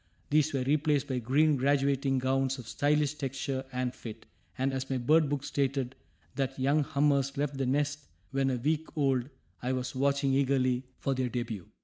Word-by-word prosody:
These 155 +1 +3
were 135 -2 0
replaced 145 +1 +2
by 130 -1 0
green 145 +5 +3
graduating 135 0 +2
gowns 130 +1 +1
of 125 -3 -9
stylish 145 +1 +1
texture 135 -2 -3
and 125 0 -2
fit, 110 -4 -9 0.3
and, 135 +1 0
as 130 0 -3
my 135 - 0
bird 150 +5 +3
book 145 -1 -1
stated 135 -2 -1 0.4
that 135 -1 -2
young 140 +3 +2
hummers 140 -1 +1
left 140 -1 -1
the 135 - 0
nest 145 +2 0 0.2
when 135 0 +1
a 130 - 0
week 155 +5 0
old, 135 -3 +1 0.3
I 125 +1 -1
was 130 0 -3
watching 140 +1 +1
eagerly 130 -2 +2
for 135 - -1
their 130 -1 -1
debut. 115 -6 -4
135 Hz, 175 wpm, -30 LUFS, 130-145 Hz, 0.4 s, These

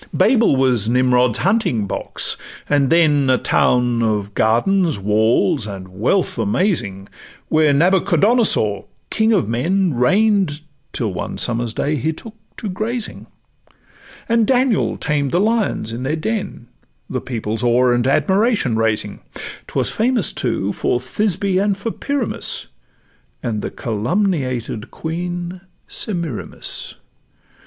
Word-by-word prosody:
Babel 230 - +4
was 125 -5 +2
Nimrod's 125 -1 +3
hunting 190 - +1
box, 95 - -1 0.3
and 145 -2 +2
then 150 -5 +3
A 130 - +4
town 125 -1 +2
of 105 -2 -1
gardens, 155 - +2
walls, 105 +1 +1
and 95 -2 -8
wealth 115 - 0
amazing, 100 - -1 0.4
Where 155 -1 +4
Nabuchadonosor, 180 - +3 0.3
king 220 0 +2
of 200 -6 +2
men, 170 - 0
Reign'd, 185 - +2 0.3
till 110 -6 -2
one - - -5
summer's 120 -1 0
day 150 +6 -1
he 160 +4 -1
took 220 +7 -11 0.2
to 220 - -5
grazing, 215 +5 -4 1.0
And 230 -2 +2
Daniel 255 -4 +2
tamed 145 -3 -1
the 175 - +2
lions 215 - 0
in 115 +2 -5
their 140 +4 -1
den, 200 - -4 0.4
The - - -3
people's 110 -3 -3
awe 125 +1 +3
and 120 +1 +1
admiration 195 - +2
raising; 110 -2 -1 0.5
'Twas - - -1
famous, 230 - +1
too, 105 -5 -1
for 120 - 0
Thisbe 190 +6 -1
and 200 -1 +1
for 225 +3 -3
Pyramus, 280 -3 -3 0.7
And 110 -3 -2
the - - -3
calumniated 125 - -2
queen 175 +2 -5 0.3
Semiramis. 170 - -4
145 Hz, 120 wpm, -19 LUFS, 115-195 Hz, 1.0 s, Babel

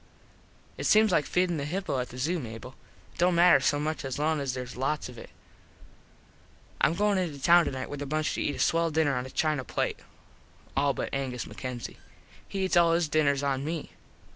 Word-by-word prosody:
It - - -3
seems 215 -1 +5
like 150 -4 +2
feedin 180 -2 +1
the 140 - -3
hippo 175 -3 -2
at 125 - -3
the 125 - -10
zoo, 165 +7 0
Mable. 115 0 -8 0.4
It - - -20
dont 175 0 +3
matter 175 +1 +6
so 145 -1 +1
much 155 +1 -2
as 135 -1 -4
long 155 +1 +1
as 135 -3 -2
theres 125 -1 -6
lots 135 +3 -2
of 125 - -11
it. - - -11 1.5
Im 165 - +4
goin 205 +1 +2
into 160 -6 -3
town 170 +4 +5
tonite 130 -1 -4
with 145 0 -7
a 145 - -4
bunch 155 +2 -1
to - - -3
eat 145 - -1
a - - -8
swell 165 0 +2
dinner 155 -3 +1
on 125 +1 -3
a - - -10
china 150 -1 0
plate. - - -2 0.8
All 140 0 +2
but - - -4
Angus 130 -3 -3
MacKenzie. 125 -3 -7 0.5
He 195 -1 -2
eats 185 - 0
all 170 -1 +5
his 165 -2 +1
dinners 140 -2 +2
on 135 -1 0
me. 160 +1 -4
150 Hz, 210 wpm, -28 LUFS, 135-170 Hz, 1.5 s, matter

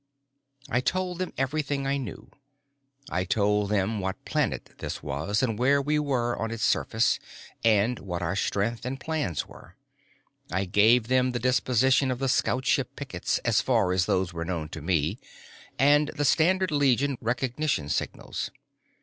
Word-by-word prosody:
I 120 - +1
told 180 +4 -1
them 185 - -2
everything 140 +1 -1
I 140 +1 +1
knew. 125 -7 -7 0.8
I 90 - 0
told 105 +1 +1
them 105 +1 0
what 95 0 -4
planet - - -1
this - - -5
was, 80 - -1
and 115 -4 -1
where 140 +3 +4
we 150 +2 +1
were 125 -5 0
on 115 - -1
its 115 -1 -2
surface, 110 0 +2 0.4
and 115 +2 +3
what 90 -2 -4
our 85 +2 -1
strength 105 +3 -1
and 130 +2 -4
plans 145 - -2
were. - - -15 0.8
I 95 +2 0
gave 110 +5 +4
them 130 0 +2
the 120 - -1
disposition 130 +2 +2
of 130 - -1
the 135 +1 -1
scoutship 130 0 +1
pickets, - - -2
as 115 -3 +3
far 110 -8 +2
as 90 -1 +1
those 95 -1 0
were 85 0 -3
known 85 -3 -3
to 80 - -7
me, 85 +4 0 0.6
and 145 +2 +4
the 145 - 0
standard 185 +5 +3
Legion 140 -1 +2
recognition 125 - -1
signals. 75 - -3
120 Hz, 160 wpm, -27 LUFS, 100-135 Hz, 0.8 s, where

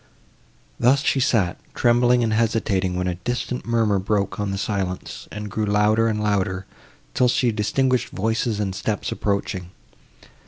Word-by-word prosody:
Thus 135 +4 +4
she 135 - +2
sat, 105 -9 +1 0.2
trembling 120 0 +3
and 110 -1 +1
hesitating, 105 -5 +1
when 90 0 -1
a 90 - 0
distant 125 +2 -3
murmur 110 -4 +2
broke 100 +1 -1
on 105 -1 -1
the 100 - -2
silence, 95 -2 -3
and 105 0 -5
grew 110 0 -1
louder 105 +2 +3
and 105 -1 -1
louder, 95 -2 0 0.5
till 125 - +3
she 120 0 +2
distinguished 125 +4 +1
voices 110 +1 -1
and 100 -2 -1
steps 105 +2 -2
approaching. 100 -3 -2
105 Hz, 150 wpm, -23 LUFS, 100-115 Hz, 0.5 s, Thus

